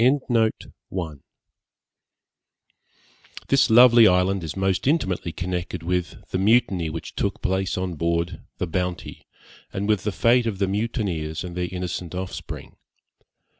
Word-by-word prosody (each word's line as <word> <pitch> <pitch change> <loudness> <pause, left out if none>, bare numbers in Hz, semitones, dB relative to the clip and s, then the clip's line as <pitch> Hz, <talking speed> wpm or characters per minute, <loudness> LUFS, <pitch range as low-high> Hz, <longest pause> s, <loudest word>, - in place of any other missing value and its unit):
This 135 0 +4
lovely 120 0 +8
island 90 0 +2
is 80 - -5
most 95 +3 0
intimately 95 - 0
connected 90 0 -4
with 90 0 -3
the 95 - 0
mutiny 95 -5 +3
which 80 +1 -6
took - - -2
place 95 0 0
on 90 -1 -2
board 85 +1 -1 0.2
the - - -1
Bounty, 90 0 -4 0.4
and 100 +1 -3
with 105 -3 +1
the 105 - -1
fate 115 +3 +3
of 105 -4 -2
the 100 0 +1
mutineers 95 -7 -2
and 90 -1 -7
their 90 -1 -2
innocent 90 -1 -4
offspring. 95 0 -7
95 Hz, 125 wpm, -24 LUFS, 90-105 Hz, 0.4 s, lovely